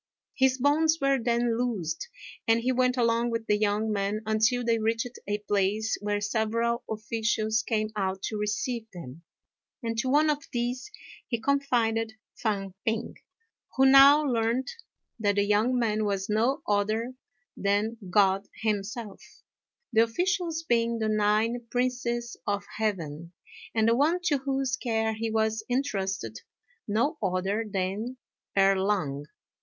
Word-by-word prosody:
His 260 Hz, -1 st, +3 dB
bonds 310 Hz, +4 st, +3 dB
were 275 Hz, -1 st, +2 dB
then 235 Hz, 0 st, +1 dB
loosed, 200 Hz, -, -2 dB, 0.4 s
and 225 Hz, 0 st, +4 dB
he 255 Hz, +2 st, +1 dB
went 250 Hz, 0 st, +2 dB
along 235 Hz, 0 st, +2 dB
with 230 Hz, -1 st, -2 dB
the 210 Hz, -, +2 dB
young 210 Hz, +1 st, 0 dB
man 205 Hz, +1 st, -1 dB
until 220 Hz, +3 st, +2 dB
they 230 Hz, -1 st, +2 dB
reached 230 Hz, +2 st, -1 dB
a 205 Hz, 0 st, 0 dB
place 205 Hz, +2 st, +1 dB
where 205 Hz, 0 st, -1 dB
several 230 Hz, +3 st, 0 dB
officials 220 Hz, 0 st, 0 dB
came 215 Hz, -2 st, -1 dB
out 190 Hz, -1 st, -2 dB
to 220 Hz, -, -3 dB
receive 220 Hz, +2 st, -2 dB
them; 165 Hz, -5 st, -10 dB, 0.6 s
and 230 Hz, 0 st, -2 dB
to 260 Hz, +1 st, 0 dB
one 300 Hz, +3 st, +4 dB
of 290 Hz, -1 st, -4 dB
these 245 Hz, +4 st, -2 dB, 0.4 s
he 235 Hz, -, -2 dB
confided 225 Hz, -4 st, +1 dB, 0.2 s
Fang 195 Hz, -4 st, -2 dB
p'ing, 225 Hz, +1 st, -1 dB, 0.6 s
who 265 Hz, -, +4 dB
now 275 Hz, +3 st, +8 dB
learnt 240 Hz, 0 st, 0 dB, 0.5 s
that 205 Hz, -2 st, +1 dB
the 205 Hz, -, +3 dB
young 210 Hz, +5 st, +2 dB
man 215 Hz, -3 st, +1 dB
was 200 Hz, -2 st, -1 dB
no 235 Hz, +7 st, +1 dB
other 215 Hz, +4 st, 0 dB, 0.4 s
than 205 Hz, +3 st, 0 dB
God 195 Hz, +1 st, +3 dB, 0.2 s
himself, 215 Hz, +1 st, -3 dB, 0.7 s
the 220 Hz, -, +6 dB
officials 335 Hz, +7 st, 0 dB
being 235 Hz, -4 st, +1 dB
the 220 Hz, -1 st, -1 dB
nine 215 Hz, +3 st, +1 dB
princes 245 Hz, -1 st, -1 dB
of 200 Hz, 0 st, -1 dB
heaven, 170 Hz, -6 st, -3 dB, 0.4 s
and 220 Hz, 0 st, +3 dB
the 230 Hz, -, +4 dB
one 310 Hz, +7 st, +2 dB
to 295 Hz, -5 st, +2 dB
whose 270 Hz, -1 st, -1 dB
care 225 Hz, -3 st, 0 dB
he 225 Hz, +1 st, -3 dB
was 220 Hz, 0 st, 0 dB
entrusted 210 Hz, -7 st, -2 dB, 0.5 s
no 235 Hz, +9 st, 0 dB
other 195 Hz, +3 st, 0 dB
than 200 Hz, +6 st, -2 dB, 0.4 s
Erh 195 Hz, 0 st, +5 dB
Lang. 145 Hz, -8 st, -1 dB
225 Hz, 140 wpm, -27 LUFS, 210-245 Hz, 0.7 s, now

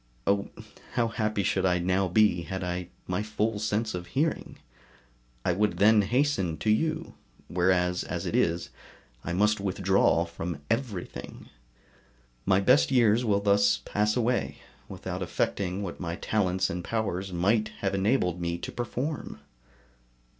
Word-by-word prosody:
Oh! 100 Hz, 0 st, +1 dB, 0.4 s
how 115 Hz, -1 st, +1 dB
happy 110 Hz, -2 st, -1 dB
should 95 Hz, +1 st, +1 dB
I 90 Hz, -1 st, +3 dB
now 95 Hz, +2 st, +1 dB
be, 90 Hz, -1 st, +3 dB
had 95 Hz, +2 st, -5 dB
I 90 Hz, 0 st, -3 dB, 0.2 s
my 90 Hz, +2 st, -1 dB
full 110 Hz, 0 st, -1 dB
sense 110 Hz, +1 st, -1 dB
of 90 Hz, -1 st, -5 dB
hearing; 145 Hz, -, -1 dB, 0.9 s
I -, -, +3 dB
would 105 Hz, +4 st, +1 dB
then 105 Hz, +1 st, +6 dB
hasten 105 Hz, -, +1 dB
to 110 Hz, -, +1 dB
you; 155 Hz, +9 st, 0 dB, 0.4 s
whereas, 90 Hz, 0 st, +2 dB
as 85 Hz, +2 st, -4 dB
it 85 Hz, -, -2 dB
is, 85 Hz, +1 st, +1 dB, 0.5 s
I 85 Hz, -, -3 dB
must 105 Hz, +3 st, +2 dB
withdraw 95 Hz, -3 st, +2 dB
from 85 Hz, -2 st, -5 dB
everything. 110 Hz, -, -4 dB, 1.0 s
My 95 Hz, 0 st, +4 dB
best 75 Hz, -7 st, +4 dB
years 120 Hz, -2 st, +4 dB
will 100 Hz, -3 st, +2 dB
thus 100 Hz, -9 st, +4 dB
pass 105 Hz, +2 st, +1 dB
away, 120 Hz, +1 st, 0 dB, 0.3 s
without -, -, -5 dB
effecting 95 Hz, 0 st, -1 dB
what 90 Hz, -, -6 dB
my 85 Hz, -2 st, -3 dB
talents 95 Hz, -2 st, 0 dB
and 90 Hz, +1 st, -4 dB
powers 100 Hz, -4 st, -2 dB
might 100 Hz, +5 st, +2 dB
have 100 Hz, -1 st, 0 dB
enabled 95 Hz, -3 st, +1 dB
me 85 Hz, 0 st, -1 dB
to -, -, -6 dB
perform. 130 Hz, +4 st, -4 dB
100 Hz, 145 wpm, -28 LUFS, 90-110 Hz, 1.0 s, then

